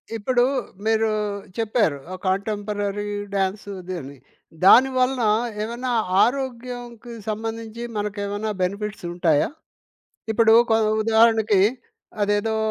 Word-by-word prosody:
ఇప్పుడు 245 +3 +1 0.4
మీరు 220 0 +2 0.5
చెప్పారు 220 - +1 0.2
ఒక 185 - -6
కాంటెంపరరీ 205 +1 -2 0.3
డ్యాన్స్ 195 +2 -1
ఇది 185 0 -6
అని. 140 +1 -10 0.5
దానివలన 255 +2 +5 0.4
ఏమన్నా 240 +3 -3 0.3
ఆరోగ్యంకి 245 -2 -4 0.2
సంబంధించి 225 +1 -5 0.2
మనకేమన్న 205 +1 -3
బెనిఫిట్స్ 200 +2 -3
ఉంటాయా? 165 -4 +2 0.8
ఇప్పుడు 225 0 +4 0.2
కొ 220 - +5 0.2
ఉదాహరణకి, 220 -2 +4 0.6
అదేదో 205 +2 +1
220 Hz, 90 wpm, -23 LUFS, 205-235 Hz, 0.8 s, దానివలన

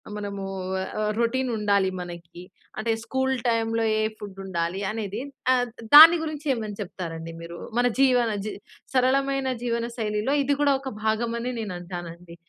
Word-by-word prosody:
మనమూ 200 -1 -5 0.5
ఆహ్, 210 - 0
రొటీన్ 255 +2 +1
ఉండాలి 200 -2 +2
మనకి? 175 -1 -9 0.4
అంటే, 225 +1 0
స్కూల్ 265 +2 0
టైమ్‌లో 225 -1 +1 0.2
ఏ - - +2 0.2
ఫుడ్ 200 -2 -9
ఉండాలి 175 0 -2
అనేది. 215 0 -4 0.3
ఆహ్, 250 -1 +3
ద 230 0 -15
దాని 325 +3 +12
గురించి 310 -1 -5
ఏమని 215 -4 -5
చెప్తారండి 165 -4 -6
మీరు? 170 +1 -8 0.2
మన 245 0 +4
జీవన, 250 -3 +4 0.2
జి 215 - -3 0.4
సరళమైన 270 +1 +2 0.2
జీవనశైలిలో 235 0 -1
ఇది 285 +1 +1
కూడా, 285 -1 +4
ఒక 270 0 -6
భాగమని 230 +2 -1
నేనంటానండి. 175 -3 -7
225 Hz, 140 wpm, -25 LUFS, 190-250 Hz, 0.5 s, దాని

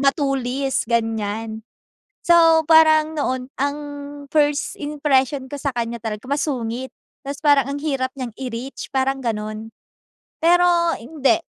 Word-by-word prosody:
matulis, 275 -2 0
ganyan. 225 -1 -1 0.6
So, 330 -2 +5
parang 315 -1 +5
noon 255 -3 -1
ang 285 +1 0 0.5
first 295 -2 +1
impression 285 -2 0
ko - - -4
sa 280 -1 -2
kanya 235 0 -3
talaga 215 0 -5
masungit. 260 -4 -2 0.3
Tas 280 +1 -5
parang 285 -3 +4
ang 285 - -4
hirap 270 -4 -1
niyang 255 -4 -5
i-reach 255 +1 -6
parang 270 0 +1
ganun. 215 0 -4 0.7
Pero 345 0 +4
hindi. 300 +5 +1
275 Hz, 120 wpm, -21 LUFS, 240-300 Hz, 0.7 s, So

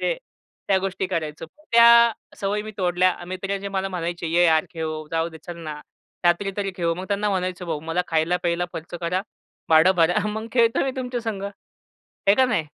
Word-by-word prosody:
ते - - +1 0.5
त्या 190 -1 +4
गोष्टी 190 0 -2
करायचो. 160 -3 -4 0.3
त्या 235 0 +8 0.2
सवयी 205 +1 -1
मी 215 - -7
तोडल्या. 180 0 +2
मित्र 195 +2 -3
जे 200 +1 -5
मला 195 0 -2
म्हणायचे, 175 -2 -3
"ये 170 +2 +3
यार 160 -2 +4
खेळू, 155 -2 -4
जाऊ 165 0 0
दे, 160 -1 -12
चल 175 -1 -6
ना 150 0 -6 0.4
रात्री 175 +3 +3
तरी 200 -1 -1
खेळू." 170 -2 0
मग 185 +2 -6
त्यांना 205 0 0
म्हणायचो, 185 -1 -2
"भाऊ, 160 -3 -2
मला 180 - +1
खायला-प्यायला 170 +2 +1
खर्च 165 +2 -7
करा, 180 +2 -1 0.5
भाडं 160 +4 +6
भरा, 180 +6 +3
मग 220 +1 -4
खेळतो 235 +1 +3
मी 265 - 0
तुमच्यासंग." 240 -5 -3 0.6
आहे 200 - +1
का 260 - +4
नाही? 220 -10 0
185 Hz, 185 wpm, -23 LUFS, 170-205 Hz, 0.6 s, त्या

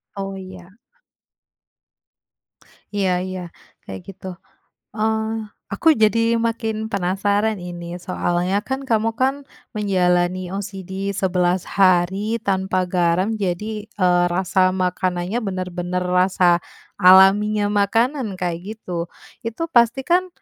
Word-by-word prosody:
Oh 195 -1 -4
iya. 185 -2 -10 2.3
Iya 195 -2 +1 0.2
iya, 185 0 -5 0.5
kayak 95 -1 -7
gitu. 190 -1 -12 0.7
Eh, 220 0 0 0.5
aku 200 +11 +1
jadi 230 +2 +3
makin 225 -1 -2 0.2
penasaran 200 +3 0
ini, 175 -1 -7
soalnya 180 +2 -1
kan 265 +1 -2
kamu, 225 -3 +1
kan, 265 +1 +3 0.4
menjalani 180 -3 +1
OCD 195 -1 -6 0.3
11 180 -2 +1
hari 195 +3 +3
tanpa 190 -1 0
garam, 180 +3 +1
jadi, 210 +4 -3
eee, 180 -2 +2
rasa 185 +2 0 0.2
makanannya 185 +3 -1
benar-benar 180 -2 -3
rasa 180 -1 +3 0.4
alaminya 200 +3 +6 0.2
makanan 230 +1 0
kayak 175 -2 -1 0.2
gitu. 175 -5 -5 0.4
Itu 230 +7 -4
pasti 240 +2 +3
kan, 365 +2 +2
190 Hz, 105 wpm, -21 LUFS, 180-215 Hz, 2.3 s, alaminya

